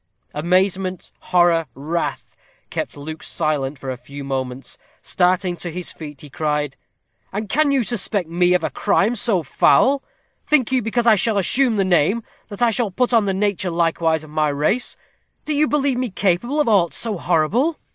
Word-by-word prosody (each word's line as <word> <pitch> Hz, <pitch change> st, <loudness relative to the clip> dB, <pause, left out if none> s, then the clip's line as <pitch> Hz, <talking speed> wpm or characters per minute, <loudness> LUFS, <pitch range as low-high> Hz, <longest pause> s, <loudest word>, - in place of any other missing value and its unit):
Amazement, 185 Hz, +3 st, 0 dB
horror, 175 Hz, -3 st, +2 dB
wrath, 160 Hz, +5 st, -4 dB, 0.4 s
kept -, -, -4 dB
Luke 155 Hz, +2 st, -7 dB
silent 150 Hz, -3 st, -1 dB
for 130 Hz, 0 st, -5 dB
a 130 Hz, -, -5 dB
few 140 Hz, +3 st, -10 dB
moments. 130 Hz, -1 st, -5 dB, 0.2 s
Starting 180 Hz, 0 st, +1 dB
to 175 Hz, -, -5 dB
his 180 Hz, +1 st, -5 dB
feet, 150 Hz, -4 st, -10 dB
he 150 Hz, -, -10 dB
cried: 150 Hz, -2 st, -2 dB, 0.6 s
"And 210 Hz, +2 st, -4 dB
can 300 Hz, +7 st, +2 dB
you 270 Hz, -3 st, +2 dB
suspect 205 Hz, -5 st, 0 dB
me 175 Hz, +2 st, +2 dB
of 180 Hz, -, 0 dB
a -, -, -1 dB
crime 210 Hz, +2 st, +1 dB
so 205 Hz, -6 st, +2 dB
foul? 270 Hz, -, +3 dB, 0.4 s
Think 270 Hz, -6 st, +2 dB
you, 260 Hz, -1 st, +2 dB
because 235 Hz, +2 st, -1 dB
I 230 Hz, -, +7 dB
shall 210 Hz, +1 st, +2 dB
assume 240 Hz, +5 st, +2 dB
the 195 Hz, -2 st, +1 dB
name, 185 Hz, +5 st, +2 dB, 0.2 s
that 205 Hz, +2 st, -4 dB
I 235 Hz, -, +4 dB
shall 225 Hz, 0 st, 0 dB
put 245 Hz, +6 st, 0 dB
on 225 Hz, -3 st, +4 dB
the 195 Hz, -, 0 dB
nature 200 Hz, -2 st, 0 dB
likewise 165 Hz, -2 st, 0 dB
of 155 Hz, -, -13 dB
my 155 Hz, -1 st, +1 dB
race? 150 Hz, -, -1 dB, 0.5 s
Do 305 Hz, -, -1 dB
you 300 Hz, +1 st, +2 dB
believe 280 Hz, -4 st, +1 dB
me 255 Hz, -1 st, -1 dB
capable 200 Hz, -, 0 dB
of 295 Hz, -, +2 dB
aught 195 Hz, -7 st, +3 dB
so 215 Hz, -6 st, -1 dB
horrible?" 200 Hz, -, +1 dB
185 Hz, 180 wpm, -20 LUFS, 160-230 Hz, 0.6 s, I